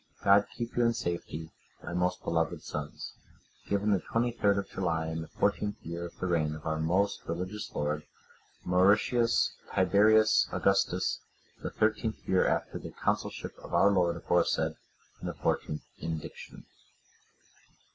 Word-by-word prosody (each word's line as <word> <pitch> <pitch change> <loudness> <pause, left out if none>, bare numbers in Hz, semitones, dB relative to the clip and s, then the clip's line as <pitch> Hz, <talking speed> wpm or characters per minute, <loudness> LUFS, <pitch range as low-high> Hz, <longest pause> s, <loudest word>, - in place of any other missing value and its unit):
God 100 +1 +5
keep 120 -1 -4
you 120 - +3
in 115 0 +3
safety, 80 -2 -4 0.3
my - - -6
most 90 +1 0
beloved 80 -2 -1
sons. 75 -1 -6 0.5
Given 100 +1 +1
the 100 - +3
23rd 115 -4 +1
of 100 - -2
July, 85 -4 -1
in 80 0 -3
the 80 - -7
fourteenth 105 0 0
year 85 +1 -4
of 85 - -16
the - - -3
reign 80 -4 +1
of 75 - -11
our 80 0 -1
most 95 +6 +1
religious 90 +5 -4
lord, 75 +1 -2 0.6
Mauritius 110 +6 +3 0.2
Tiberius 105 +4 +5
Augustus, 95 -2 +1 0.4
the - - -3
thirteenth 110 +1 -1
year 95 -1 +3
after - - -1
the - - -7
consulship - - -2
of - - -5
our 100 - +6
lord 90 -3 +2
aforesaid, - - +1 0.5
and - - -4
the - - -6
fourteenth 75 - -1 0.2
indiction." 80 -2 -6
90 Hz, 145 wpm, -30 LUFS, 80-105 Hz, 0.6 s, our